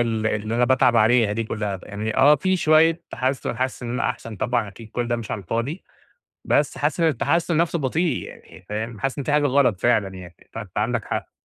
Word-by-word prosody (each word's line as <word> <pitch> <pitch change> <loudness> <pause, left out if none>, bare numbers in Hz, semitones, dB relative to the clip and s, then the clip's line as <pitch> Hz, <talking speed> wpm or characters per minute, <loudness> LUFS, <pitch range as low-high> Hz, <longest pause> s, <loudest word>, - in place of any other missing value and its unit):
اللي 110 -2 0
اللي 110 +2 -4
أنا 125 +1 +3
باتعب 125 -1 +3
عليها 115 -1 +4
دي 115 +2 -2
كلّها، 105 -3 -3
بأ - - -15
يعني 105 +2 -4
آه، 145 +3 +7
في 185 +6 +1
شوية 160 +1 +4
تحسّن، 130 -1 -2
حاسس 130 0 -2
إن 120 - -4
أنا 125 - 0
أحسن، 110 -3 -8
طبعًا 120 -1 -1
أكيد 110 +2 -12
كل 120 0 -2
ده 120 - 0
مش 115 -3 -7
على - - -2
الفاضي، 115 - -3 0.6
بس - - +1
حاسس - - -1
إن 165 - +4
التحسّن 165 +4 +1
نفسه 170 0 +1
بطيء 155 +3 0
يعني 90 - -14
فاهم؟ 110 +1 -4
حاسس 135 +1 -2
إن 140 - -3
في 145 - -2
حاجة 150 0 +3
غلط 125 -8 +2
فعلًا 110 -5 +3
يعني، 90 -2 -10 0.2
فأنت 105 -4 -8
عندك 110 +1 0
حق. - - -4
120 Hz, 220 wpm, -23 LUFS, 110-140 Hz, 0.6 s, آه